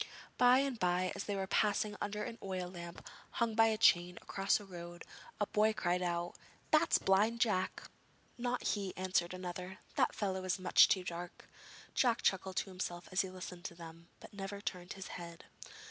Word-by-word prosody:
By 250 0 +7
and 270 -3 0
bye 180 0 +1
as - - -5
they 205 - -2
were 195 -1 -1
passing 210 +1 +1
under 210 +1 -2
an 235 0 -6
oil 185 -2 -3
lamp 170 -1 -9 0.3
hung 235 -2 +1
by 225 0 +5
a 220 -1 +1
chain 180 -5 +4
across 195 0 +1
the 205 - -10
road, 175 -2 -9 0.4
a 205 - +2
boy 215 +1 +3
cried 180 -3 0
out: 175 -1 -1 0.4
'That's 310 +1 +5
Blind 210 +5 +3
Jack!' 195 -6 +1 0.5
'Not 245 0 -1
he,' 200 -3 -2
answered 185 -2 +1
another; 180 +1 -6 0.2
'that - - +3
fellow 190 -2 -1
is 185 +1 0
much 185 -1 +6
too 185 - +2
dark.' 175 0 -7 0.5
Jack 235 -3 +2
chuckled 190 0 +1
to 195 - -1
himself 175 -2 -5
as 185 - +3
he 190 - -4
listened 180 -1 -8
to 170 - -5
them, 165 0 -11
but - - -13
never 200 0 -5
turned 180 -3 -5
his 195 -1 -8
head. 170 -1 -8
190 Hz, 185 wpm, -35 LUFS, 180-210 Hz, 0.5 s, By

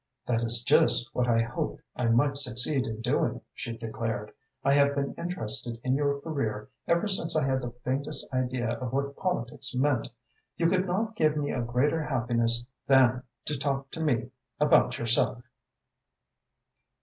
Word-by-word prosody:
"That 115 -2 0
is 115 0 +3
just 120 +4 +4
what 125 0 0
I 115 -1 +3
hoped 115 - -4
I 125 - -1
might 125 +5 +3
succeed 130 0 +2
in 110 0 -5
doing," 120 - 0
she 115 -1 -6
declared. 110 -2 -4 0.3
"I 140 - +3
have 140 0 +4
been 140 -1 -2
interested 120 -8 -3
in 130 - +1
your 140 0 +1
career 110 -10 -3 0.2
ever 170 +5 +2
since 190 -5 -1
I 155 -3 +2
had 130 -1 0
the 125 - -4
faintest 140 +3 -2
idea 125 -2 -1
of 125 -2 -4
what 140 +1 -2
politics 135 -7 -2
meant. 130 -2 +1 0.5
You 165 - +2
could 185 +1 +1
not 220 +5 -1
give 155 -5 +2
me 145 -1 -1
a 125 - -2
greater 125 +7 +1
happiness 120 -3 +1 0.2
than 130 -2 +5 0.2
to 150 - 0
talk 135 -1 -2
to - - -7
me 130 -6 0 0.3
about 145 -4 +4
yourself." 120 +1 +3
130 Hz, 160 wpm, -28 LUFS, 120-145 Hz, 0.5 s, than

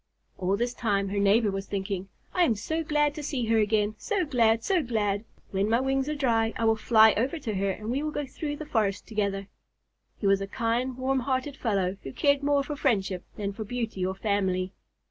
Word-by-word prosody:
All 190 +2 +1
this 240 +2 -1
time 200 -5 0
her 200 +1 -1
neighbor 205 +2 +4
was 195 0 -4
thinking, 195 -1 -3 0.2
"I 360 - +3
am 235 -9 +3
so 320 +10 -2
glad 295 -1 +2
to 300 - -6
see 275 -4 -2
her 225 0 +3
again, 210 0 +2
so 400 -5 0
glad, 230 -5 +3
so 375 -3 +2
glad! 210 -5 -1 0.3
When 195 +2 0
my 230 +2 +3
wings 270 +1 0
are 300 - -1
dry 230 -5 +1
I 230 - 0
will 225 0 +4
fly 220 0 +6
over 260 +9 0
to 230 -8 -4
her 195 0 0
and 215 +4 -3
we 270 +3 0
will 305 - -1
go 295 -1 -3
through 290 +2 -4
the 310 - -7
forest 215 -8 0
together." 200 -3 -2 0.7
He - - -5
was 195 0 +4
a 195 - -3
kind, 235 +4 -1
warm 265 +1 +1
hearted 260 +2 -1
fellow, 195 -6 0
who 135 - -7
cared 285 -1 +2
more 285 0 +2
for 295 +1 -4
friendship 195 -9 0
than 200 -1 -3
for 220 - -5
beauty 225 -3 -3
or 190 +1 -1
family. 190 -2 0
225 Hz, 220 wpm, -27 LUFS, 200-270 Hz, 0.7 s, fly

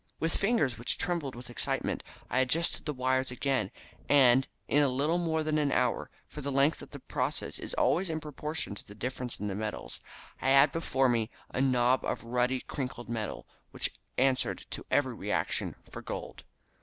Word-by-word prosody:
With 165 0 0
fingers 155 - +2
which 120 - +1
trembled 165 -8 -1
with 120 0 -9
excitement 120 - -1 0.3
I 130 - +1
adjusted 150 +7 +1
the - - +1
wires 130 0 +1
again, 125 -4 0 0.4
and 135 -2 +6 0.2
in 145 +1 +4
little 155 +5 +2
more 160 -2 +1
than 155 0 +1
an 145 -2 +2
hour 125 -2 +1 0.2
for 150 - -8
the 140 0 -2
length 140 +3 +3
of - - -10
the - - -8
process - - -2
was - - -5
always 180 +2 +2
in 160 -1 -1
proportion 150 -2 -4
to 100 - -10
the 105 - -13
difference 125 +2 -4
in 105 - -2
the 100 - -2
metals 100 - -4 0.4
I 130 - +2
had 135 +1 +7
before 135 -4 +2
me 115 -2 +1 0.2
a 125 - 0
knob 130 -1 +3
of - - -2
ruddy 125 +2 +1
crinkled 125 -4 -5
metal, 115 -2 -3 0.2
which - - +1 0.3
answered 130 0 +2
to - - -5
every - - +2
reaction - - -1 0.2
for - - -7
gold. - - -6
130 Hz, 180 wpm, -30 LUFS, 125-150 Hz, 0.4 s, had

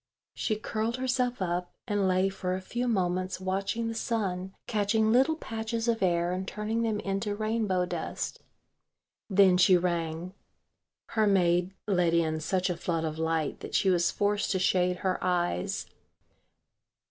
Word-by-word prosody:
She 215 - -1
curled 220 +2 -2
herself 250 -3 0
up 175 0 -2 0.2
and 205 -2 +1
lay 185 +1 +3
for 185 -1 -3
a - - -3
few 240 +6 -3
moments 185 -3 0
watching 195 +5 -1
the 230 - -2
sun 195 -5 -2
catching 215 +1 +1
little 265 +7 +4
patches 225 -4 -4
of 230 -2 +1
air 175 -1 +2
and 185 +1 -3
turning 215 +3 -2
them 220 -2 0
into 200 +1 -2
rainbow 215 -4 0
dust. - - -4 0.9
Then 190 -2 +5
she 185 0 +6
rang. 170 0 -2 0.8
Her 220 -2 +2
maid 180 -1 +2
let 180 -4 +2
in 160 -2 +1
such 185 +4 0
a 180 -2 -2
flood 165 -1 -1
of 155 0 -4
light 160 -2 -1
that - - -6
she 190 - +4
was 175 -1 +3
forced 205 0 0
to - - +1
shade 180 -1 +2
her 185 -1 0
eyes. 175 - 0
190 Hz, 155 wpm, -29 LUFS, 180-220 Hz, 0.9 s, she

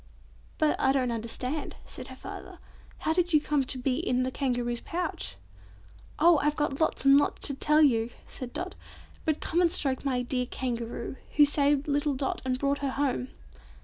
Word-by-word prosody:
"But 310 -1 +2
I 265 - +3
don't 255 -3 +1
understand," 250 +6 -3
said - - -8
her - - -10
father. - - -9 0.4
"How 315 - +1
did 350 0 +1
you 305 - +7
come 295 -1 0
to 260 - -1
be 255 0 0
in 255 -6 0
the 260 - -2
Kangaroo's 245 -3 -1
pouch?" 335 - -4 0.8
"Oh! 330 0 +5
I've 295 +1 +1
got 295 -1 -1
lots 320 - +1
and 275 +1 +8
lots - - +4
to 280 - +3
tell 300 +3 +3
you!" 230 -5 +3 0.2
said 255 -2 -7
Dot; - - -4 0.5
"but 310 -2 0
come 345 - +1
and 340 -2 +3
stroke 265 -5 +1 0.3
dear 250 -1 -1
Kangaroo, 240 0 -4 0.2
who 295 - +7
saved 285 0 +2
little 290 0 +1
Dot 265 +1 -2
and 255 -1 0
brought 280 +1 0
her 280 - -1
home." 260 -2 -1
275 Hz, 180 wpm, -28 LUFS, 255-300 Hz, 0.8 s, and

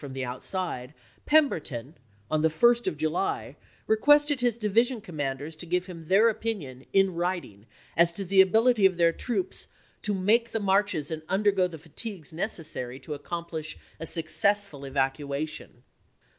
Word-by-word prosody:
from 140 -3 -8
the 130 -1 -3
outside, 130 +1 -4 0.3
Pemberton, 155 - +1 0.4
on 155 0 +2
the 160 - +4
1st 240 +9 +3
of 155 - -1
July, 155 +5 -2 0.3
requested 290 +5 +4
his 240 -2 +1
division 230 +3 +1
commanders 150 -5 -5
to 175 - -7
give 180 +1 0
him 170 -4 -10
their 200 +6 +5
opinion, 195 - -3
in 195 -1 +3
writing, 170 - -3 0.3
as 170 0 +5
to 195 +3 -3
the 190 +1 +6
ability 220 +2 +5
of 185 -2 -5
their 170 -1 +4
troops 360 - -2 0.3
"to 205 -1 0
make 220 +5 +2
the 225 - 0
marches 195 -6 +1
and 160 -1 -3
undergo 195 -1 +2
the 170 -2 -9
voi.xxiv., 155 - -12
fatigues 165 0 -5
necessary 155 - -4
to 145 +3 -6
accomplish 160 +1 -5 0.2
a 165 - -2
successful 165 +2 +1
evac 135 -1 0
p. 150 - -8
28i." - - -8 0.2
uation." 155 - -7
175 Hz, 165 wpm, -27 LUFS, 155-210 Hz, 0.4 s, the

